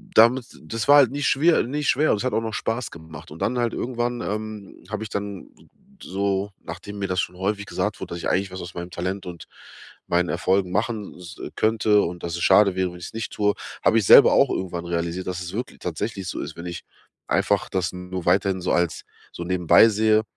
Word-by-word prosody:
damit 120 Hz, +3 st, +6 dB, 0.2 s
das 115 Hz, -1 st, -4 dB
war 145 Hz, +1 st, +8 dB
halt 135 Hz, -5 st, +6 dB
nie 145 Hz, +1 st, -4 dB
schwier 160 Hz, +6 st, +3 dB
nie 145 Hz, +5 st, -3 dB
schwer 145 Hz, +2 st, +3 dB
und -, -, +2 dB
es 100 Hz, -, -4 dB
hat 130 Hz, -, -1 dB
auch 115 Hz, -, +1 dB
noch 110 Hz, -1 st, -4 dB
Spaß 115 Hz, +2 st, -2 dB
gemacht. 80 Hz, -2 st, -11 dB
Und 80 Hz, -, -10 dB
dann 125 Hz, -, 0 dB
halt 120 Hz, -1 st, 0 dB
irgendwann, 120 Hz, 0 st, -2 dB
ähm, 105 Hz, -1 st, -6 dB
hab 105 Hz, 0 st, -4 dB
ich 110 Hz, -, -5 dB
dann 100 Hz, -1 st, -5 dB, 0.5 s
s -, -, -10 dB
so 100 Hz, +1 st, -1 dB
nachdem 95 Hz, +5 st, -8 dB
mir 100 Hz, -, -1 dB
das 90 Hz, -1 st, -1 dB
schon 90 Hz, 0 st, -3 dB
häufig 100 Hz, +2 st, -2 dB
gesagt -, -, -2 dB
wurde, -, -, -6 dB
dass -, -, -5 dB
ich -, -, -2 dB
eigentlich 95 Hz, +1 st, 0 dB
was 95 Hz, -, -6 dB
aus 90 Hz, 0 st, -8 dB
meinem 85 Hz, 0 st, -5 dB
Talent 95 Hz, +3 st, -4 dB
und 85 Hz, -2 st, -8 dB, 0.6 s
meinen 85 Hz, 0 st, +1 dB
Erfolgen 95 Hz, -1 st, +1 dB
machen 105 Hz, +1 st, -2 dB
s 90 Hz, -2 st, -11 dB, 0.2 s
könnte 110 Hz, -1 st, +3 dB
und 90 Hz, -1 st, -4 dB
dass 85 Hz, 0 st, -3 dB
es 85 Hz, -, -3 dB
schade 100 Hz, -3 st, +5 dB
wäre, 95 Hz, -1 st, 0 dB
wenn 90 Hz, -, -11 dB
ich's 85 Hz, -, -8 dB
nicht 115 Hz, -1 st, -4 dB
tue, 105 Hz, -1 st, +2 dB, 0.3 s
hab -, -, +4 dB
ich 110 Hz, -4 st, +3 dB
selber -, -, +9 dB
auch -, -, +4 dB
irgendwann 85 Hz, -2 st, -3 dB
realisiert, 85 Hz, +1 st, -2 dB
dass 90 Hz, 0 st, -3 dB
es 90 Hz, +2 st, -6 dB
wirkl 120 Hz, +4 st, -5 dB
tatsächlich 95 Hz, +3 st, -4 dB
so -, -, -4 dB
ist, -, -, -7 dB
wenn 85 Hz, -, -7 dB
ich 85 Hz, -, -6 dB, 0.4 s
einfach -, -, +1 dB
das 90 Hz, -2 st, -1 dB
nur 90 Hz, 0 st, -6 dB
weiterhin 95 Hz, -1 st, +2 dB
so 90 Hz, -, -1 dB
als 85 Hz, -1 st, 0 dB, 0.3 s
so 85 Hz, -, -7 dB
nebenbei 90 Hz, +4 st, +5 dB
sehe 110 Hz, 0 st, +3 dB
100 Hz, 225 wpm, -24 LUFS, 90-110 Hz, 0.6 s, selber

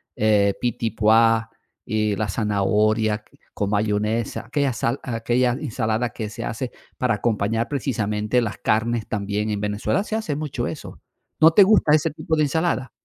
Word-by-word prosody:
eh, 105 Hz, -2 st, +3 dB
pitipua 115 Hz, -1 st, +2 dB, 0.4 s
y 110 Hz, -3 st, 0 dB
la 105 Hz, 0 st, -2 dB
zanahoria 105 Hz, +1 st, +1 dB, 0.3 s
con 100 Hz, 0 st, -2 dB
mayonesa? 105 Hz, +2 st, -1 dB
Aquella 140 Hz, +2 st, 0 dB
sal 120 Hz, +2 st, -1 dB
aquella 120 Hz, +1 st, 0 dB
ensalada 115 Hz, -3 st, -2 dB
que 105 Hz, -1 st, -5 dB
se -, -, -6 dB
hace 120 Hz, +2 st, -4 dB, 0.3 s
para 125 Hz, -4 st, +1 dB
acompañar 115 Hz, +1 st, 0 dB
precisamente 110 Hz, -4 st, -1 dB
las 110 Hz, -3 st, -3 dB
carnes 115 Hz, +1 st, 0 dB
también 105 Hz, 0 st, -2 dB
en 105 Hz, -1 st, -2 dB
Venezuela 105 Hz, -, -1 dB
se 220 Hz, -, -3 dB
hace 195 Hz, -11 st, -2 dB
mucho 140 Hz, -5 st, -3 dB
eso. 155 Hz, -, -8 dB, 0.4 s
¿No 160 Hz, +1 st, +8 dB
te 200 Hz, +4 st, +7 dB
gusta 190 Hz, -7 st, +4 dB
ese 155 Hz, +1 st, +3 dB
tipo 160 Hz, +1 st, -2 dB
de 155 Hz, -, +3 dB
ensalada? 150 Hz, -3 st, 0 dB
115 Hz, 150 wpm, -22 LUFS, 105-130 Hz, 0.4 s, No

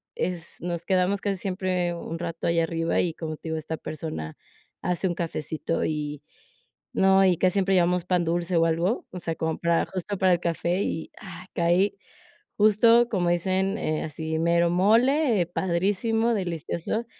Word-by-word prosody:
Es 175 Hz, -2 st, -4 dB
nos 170 Hz, 0 st, -3 dB
quedamos 190 Hz, +1 st, +2 dB
casi 200 Hz, -2 st, -1 dB
siempre 185 Hz, -2 st, -1 dB
un 165 Hz, -1 st, -6 dB
rato 170 Hz, -1 st, -4 dB
allá 170 Hz, 0 st, +2 dB
arriba, 165 Hz, 0 st, 0 dB
y 170 Hz, -, -1 dB
como 155 Hz, -1 st, -5 dB
te 160 Hz, -, -8 dB
digo 160 Hz, -, -1 dB
esta 160 Hz, +1 st, -4 dB
persona 155 Hz, -, -6 dB, 0.4 s
hace 180 Hz, +1 st, 0 dB
un 175 Hz, -, -2 dB
cafecito, 165 Hz, -1 st, -3 dB
y 150 Hz, -2 st, -3 dB, 0.7 s
no. 195 Hz, 0 st, +5 dB
Y 180 Hz, -2 st, +3 dB
casi 185 Hz, +1 st, +2 dB
siempre 195 Hz, -1 st, +1 dB
llevamos 180 Hz, 0 st, +2 dB
pan 180 Hz, -1 st, +1 dB
dulce 170 Hz, +2 st, -1 dB
o 165 Hz, -, +4 dB
algo, 170 Hz, +7 st, 0 dB
o 180 Hz, -, -6 dB
sea, 165 Hz, -2 st, -3 dB
como 160 Hz, 0 st, -2 dB
para 170 Hz, 0 st, +2 dB
justo 190 Hz, +2 st, -4 dB
para 185 Hz, 0 st, +3 dB
el 175 Hz, -, +1 dB
café 170 Hz, +2 st, 0 dB
y, 160 Hz, -, -4 dB
ah, 180 Hz, -3 st, -10 dB
caí 180 Hz, +4 st, +2 dB, 0.6 s
justo 230 Hz, +3 st, +5 dB
como 185 Hz, -6 st, 0 dB
dicen, 190 Hz, +3 st, 0 dB
eh, 155 Hz, -7 st, -1 dB
así 160 Hz, +1 st, -3 dB
mero 170 Hz, +1 st, +3 dB
mole, 230 Hz, -, +3 dB
eh, -, -, +1 dB
padrísimo, 200 Hz, +7 st, 0 dB
delicioso, 175 Hz, +3 st, -3 dB
175 Hz, 170 wpm, -26 LUFS, 165-190 Hz, 0.7 s, no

